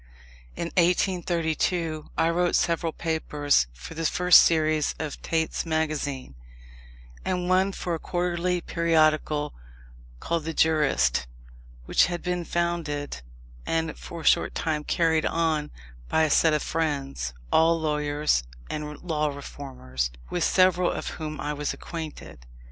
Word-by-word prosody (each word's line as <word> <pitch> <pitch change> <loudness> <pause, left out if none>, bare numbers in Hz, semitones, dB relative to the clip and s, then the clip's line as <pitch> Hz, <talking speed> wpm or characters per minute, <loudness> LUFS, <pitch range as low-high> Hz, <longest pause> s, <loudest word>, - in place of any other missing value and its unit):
In 170 - -3
1832 170 -2 +1
I 165 - +3
wrote 175 +1 +1
several 170 -1 +1
papers 150 - +1
for - - -10
the 165 0 -4
first 180 +1 +7
series 155 -2 +2
of 155 -2 -5
Tait's 160 -1 -1
Magazine, 155 - -2 0.9
and 180 -1 -1
one 185 +2 +3
for 180 -2 -4
a 165 - -2
quarterly 175 0 -1
periodical 155 -3 +1 0.7
called 165 - -2
the 165 -1 -4
Jurist, 150 - +2 0.6
which - - +4
had 175 -1 -4
been 180 -1 -2
founded, 160 - -2 0.5
and 160 -1 -1
for 170 - -8
a - - -10
short - - +3
time 155 -2 -1
carried 160 0 +2
on, 160 -3 0 0.4
by 160 - +3
a 155 - +1
set 160 +1 +4
of 150 - -1
friends, 140 - -2 0.2
all 165 +1 +4
lawyers 150 - 0 0.3
and 150 -1 -5
law 155 -4 0
reformers, 130 - -5 0.2
with - - 0
several 185 -1 +4
of - - -3
whom 155 -2 -4
I 150 - -2
was 150 0 -3
acquainted. 155 - -8
160 Hz, 130 wpm, -26 LUFS, 150-170 Hz, 0.9 s, first